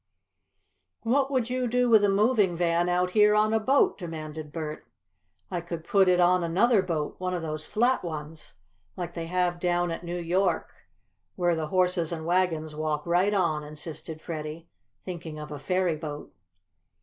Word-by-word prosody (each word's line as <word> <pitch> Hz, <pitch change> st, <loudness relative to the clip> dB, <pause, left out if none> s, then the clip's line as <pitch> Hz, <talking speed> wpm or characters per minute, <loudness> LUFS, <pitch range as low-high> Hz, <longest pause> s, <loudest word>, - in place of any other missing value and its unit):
"What 265 Hz, +4 st, +2 dB
would 250 Hz, -3 st, 0 dB
you 255 Hz, -1 st, 0 dB
do 250 Hz, +1 st, +2 dB
with 220 Hz, -3 st, +6 dB
a 205 Hz, -, +4 dB
moving 205 Hz, -2 st, +3 dB
van 170 Hz, 0 st, +1 dB
out 180 Hz, +1 st, +1 dB
here 210 Hz, +1 st, +5 dB
on 215 Hz, +1 st, +3 dB
a 225 Hz, -, +3 dB
boat?" 280 Hz, -, +2 dB
demanded 155 Hz, -3 st, -6 dB
Bert. 155 Hz, -1 st, -6 dB, 0.6 s
"I 175 Hz, -2 st, -2 dB
could 170 Hz, -1 st, -6 dB
put 190 Hz, +1 st, +3 dB
it 180 Hz, 0 st, +4 dB
on 180 Hz, 0 st, +4 dB
another 195 Hz, +6 st, +3 dB
boat 165 Hz, -5 st, -3 dB
one 185 Hz, 0 st, -2 dB
of 175 Hz, -, -4 dB
those 155 Hz, -1 st, -4 dB
flat 245 Hz, +4 st, +1 dB
ones, 155 Hz, -2 st, -7 dB, 0.4 s
like 175 Hz, -2 st, -4 dB
they 165 Hz, -1 st, -5 dB
have 180 Hz, 0 st, 0 dB
down 175 Hz, -1 st, +1 dB
at 165 Hz, -, -5 dB
New 175 Hz, +1 st, -4 dB
York, 175 Hz, 0 st, 0 dB, 0.6 s
where 175 Hz, -2 st, +2 dB
the 160 Hz, -1 st, -2 dB
horses 180 Hz, -1 st, +1 dB
and 160 Hz, -2 st, -4 dB
wagons 165 Hz, -3 st, 0 dB
walk 155 Hz, -1 st, -2 dB
right 180 Hz, +4 st, +2 dB
on," 160 Hz, -6 st, +1 dB
insisted 155 Hz, +1 st, -8 dB
Freddie, 160 Hz, 0 st, -6 dB, 0.4 s
thinking 170 Hz, -4 st, -7 dB
of 150 Hz, 0 st, -8 dB
a 145 Hz, -, -6 dB
ferryboat. 155 Hz, -2 st, -2 dB
175 Hz, 170 wpm, -27 LUFS, 160-190 Hz, 0.6 s, with